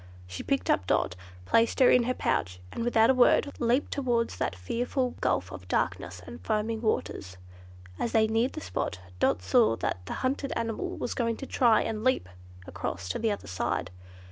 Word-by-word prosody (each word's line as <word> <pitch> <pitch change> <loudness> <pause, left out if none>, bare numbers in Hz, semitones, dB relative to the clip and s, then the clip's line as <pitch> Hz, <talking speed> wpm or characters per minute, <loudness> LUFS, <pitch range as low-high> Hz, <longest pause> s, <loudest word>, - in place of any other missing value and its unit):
She 90 +1 -7
picked 275 -1 0
up 95 - +1
Dot, 85 - +1 0.3
placed 230 - +2
her 255 - +7
in 250 -1 +5
her 255 +1 0
pouch, 90 0 -1
and 235 - -3
without 230 0 +4
a - - +3
word 255 +3 +4
leaped 245 +3 +1
forward 280 - -3
towards 230 -1 +1
that - - -1
fearful 245 - -1
gulf 90 0 0
of 90 0 -9
darkness 90 0 -2
and 80 +1 -10
foaming 215 - -1
waters. 95 - -2 0.6
As 235 - -1
they 220 -1 +4
neared 225 +4 +1
the 310 - -6
spot, 85 - -3 0.2
Dot 90 - +2
saw 105 +5 +4
that 90 -4 -3
the - - -3
hunted 275 +1 -1
animal 225 -1 -3
was - - -3
going 230 -2 -1
to - - -6
try 235 -5 +3
and 215 -1 -3
leap 255 - +2 0.4
across 95 -2 -5
to - - -2
the 225 - +1
other 205 - -3
side. 90 -1 -2
225 Hz, 195 wpm, -28 LUFS, -, 0.6 s, her